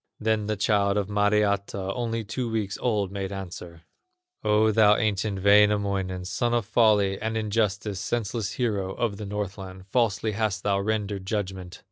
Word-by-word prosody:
Then 110 -1 0
the 110 - 0
child 100 -1 +2
of 100 -1 -1
Mariatta, 100 -2 +1
Only 115 -1 -2
two 115 +3 -3
weeks 105 -3 -2
old, 105 -6 0
made 100 -1 -4
answer: 90 -3 -8 0.6
"O, 105 +1 +3
thou 105 -1 +5
ancient 100 -2 -1
Wainamoinen, 100 -3 +3
Son 120 +6 0
of 120 -3 0
Folly 105 -4 +3
and 110 +1 -2
Injustice, 105 -2 -1
Senseless 105 -1 -2
hero 100 -6 -1
of 110 -4 -1
the 105 -1 -6
Northland, 95 -2 -6
Falsely 110 0 0
hast 105 -2 -1
thou 100 -1 +1
rendered 100 -2 -2
judgment. 95 -4 -4
105 Hz, 150 wpm, -26 LUFS, 95-110 Hz, 0.6 s, thou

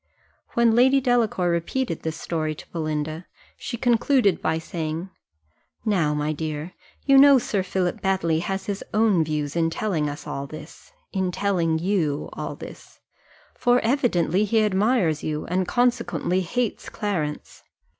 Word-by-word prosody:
When 235 -1 +4
Lady 260 +4 +5
Delacour 235 -8 +1
repeated 170 +4 -2
this 160 0 -4
story 155 -2 -2
to - - -11
Belinda, 155 0 -3 0.3
she 240 - -5
concluded 240 - +2
by 160 0 0
saying, 165 +2 -4 0.7
"Now, 170 -9 +1
my 150 +1 -1
dear, 155 +2 -5 0.3
you 275 -1 +6
know 280 0 +8
Sir 210 -5 -1
Philip 185 +2 -2
Baddely 185 -5 +1
has 190 +3 -3
his 200 -1 -4
own 210 -6 +4
views 150 -1 -3
in 165 -1 +2
telling 165 -4 -1
us 145 - -7
all 140 0 -4
this 155 - -11 0.2
in 190 -2 0
telling 175 -4 0
you, 165 -5 -1
all - - -5
this; - - -12 0.5
for 245 0 +3
evidently 215 - +1
he 220 +1 +2
admires 200 - +2
you, 150 -1 -3
and 180 +1 -1
consequently 240 -6 +1
hates 235 +6 -2
Clarence. 170 -9 -4
185 Hz, 145 wpm, -24 LUFS, 160-225 Hz, 0.7 s, know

